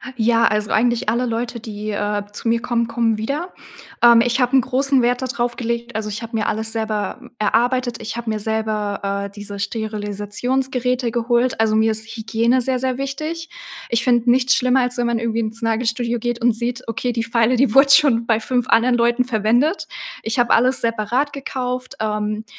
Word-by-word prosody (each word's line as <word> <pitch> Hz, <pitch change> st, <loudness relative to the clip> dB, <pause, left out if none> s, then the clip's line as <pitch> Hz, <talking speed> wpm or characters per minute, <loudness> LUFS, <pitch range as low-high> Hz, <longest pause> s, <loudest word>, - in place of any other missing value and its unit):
Ja, 230 Hz, 0 st, +3 dB
also, 210 Hz, 0 st, 0 dB
eigentlich 235 Hz, -1 st, +1 dB
alle 240 Hz, +3 st, 0 dB
Leute, 235 Hz, +1 st, -3 dB
die, 215 Hz, -2 st, -6 dB
äh, 205 Hz, 0 st, -1 dB
zu 230 Hz, -, -6 dB
mir 230 Hz, 0 st, +2 dB
kommen, 235 Hz, -1 st, 0 dB
kommen 230 Hz, -2 st, 0 dB
wieder. 285 Hz, -, -3 dB, 0.5 s
Ähm, 235 Hz, -1 st, +7 dB
ich 240 Hz, +2 st, +1 dB
habe 250 Hz, +2 st, +2 dB
'n 260 Hz, -, +6 dB
großen 265 Hz, +1 st, +1 dB
Wert 245 Hz, +1 st, +1 dB
dadrauf 245 Hz, -2 st, -2 dB
gelegt 235 Hz, 0 st, -3 dB
also, 215 Hz, -1 st, -3 dB
ich 210 Hz, +2 st, -5 dB
habe 230 Hz, 0 st, -4 dB
mir 215 Hz, -, -1 dB
alles 220 Hz, +1 st, 0 dB
selber, 215 Hz, -3 st, -2 dB
m -, -, -14 dB
erarbeitet. 240 Hz, +3 st, 0 dB
Ich 225 Hz, -, -5 dB
habe 235 Hz, -1 st, -4 dB
mir 215 Hz, -1 st, -1 dB
selber, 210 Hz, -2 st, -2 dB
äh, -, -, -6 dB
diese, 205 Hz, 0 st, -8 dB
Sterilisationsgeräte 230 Hz, +4 st, -2 dB
geholt. 240 Hz, +1 st, 0 dB
Also, 220 Hz, -1 st, +2 dB
mir 220 Hz, 0 st, +3 dB
ist 220 Hz, +1 st, -4 dB
Hygiene 230 Hz, +3 st, +1 dB
sehr 255 Hz, 0 st, 0 dB
sehr 260 Hz, 0 st, -1 dB
wichtig. 310 Hz, +5 st, -4 dB, 0.4 s
Ich 235 Hz, 0 st, 0 dB
finde 240 Hz, -1 st, +3 dB
nichts 255 Hz, +1 st, +3 dB
schlimmer, 255 Hz, +1 st, +2 dB
als 250 Hz, 0 st, -1 dB
wenn 240 Hz, -, 0 dB
man 235 Hz, -1 st, 0 dB
irgendwie 230 Hz, 0 st, -1 dB
ins 220 Hz, +1 st, -4 dB
Nagelstudio 230 Hz, +1 st, 0 dB
geht 240 Hz, +1 st, -3 dB
und 240 Hz, -1 st, +3 dB
sieht: 245 Hz, +2 st, -4 dB
„Okay, 245 Hz, +2 st, -2 dB
die 230 Hz, -1 st, -2 dB
Feile, 230 Hz, +1 st, +2 dB
die 255 Hz, -4 st, +2 dB
wurde 275 Hz, +1 st, +7 dB
schon 255 Hz, -6 st, +5 dB
bei 225 Hz, -1 st, +2 dB
5 245 Hz, +2 st, -1 dB
anderen 240 Hz, +2 st, +4 dB
Leuten 240 Hz, +1 st, +2 dB
verwendet.“ 240 Hz, -, +1 dB, 0.4 s
Ich 225 Hz, +3 st, -2 dB
habe 240 Hz, -, +3 dB
alles 255 Hz, +3 st, +3 dB
separat 230 Hz, +5 st, -1 dB
gekauft. 255 Hz, -2 st, -4 dB
Ähm, 215 Hz, 0 st, -2 dB
235 Hz, 195 wpm, -20 LUFS, 220-250 Hz, 0.5 s, Ähm